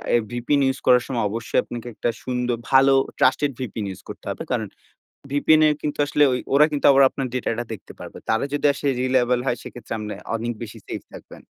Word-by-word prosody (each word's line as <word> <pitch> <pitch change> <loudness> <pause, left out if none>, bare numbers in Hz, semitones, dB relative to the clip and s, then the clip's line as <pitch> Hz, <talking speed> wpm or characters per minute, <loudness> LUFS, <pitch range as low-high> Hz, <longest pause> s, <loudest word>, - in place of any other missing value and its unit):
এ - - +6
VPN 125 +4 +1
use 135 0 0
করার 125 -1 +5
সময় 120 -4 -1
অবশ্যই 115 +2 -1
আপনাকে 120 0 -7
একটা 120 - -1
সুন্দর 125 -1 -1
ভালো 135 0 +6 0.3
trusted 135 +3 +3
VPN 110 -4 -4
ইউজ 95 - -8
করতে - - -9
হবে। - - -4
কারণ - - -1 0.6
VPN 155 +2 +4
এর 150 - +2
কিন্তু 150 -1 -3
আসলে 150 - +2
ঐ - - +2 0.2
ওরা 150 +2 +7
কিন্তু 145 - +1
আবার 140 0 +6
আপনার 135 - -3
ডেটাটা 120 -1 -2
দেখতে 110 - -9
পারবে। - - -9
তারা 110 +3 +1
যদি 145 0 +1
আসে 140 - -6
reliable 125 -1 +2
হয়, 120 - 0
সেক্ষেত্রে 120 - -9
আপনে 105 0 -5 0.2
অনেক 115 +1 -2
বেশি 110 - -8
সেফ - - -5
থাকবেন। - - -13
125 Hz, 200 wpm, -23 LUFS, 120-140 Hz, 0.6 s, ওরা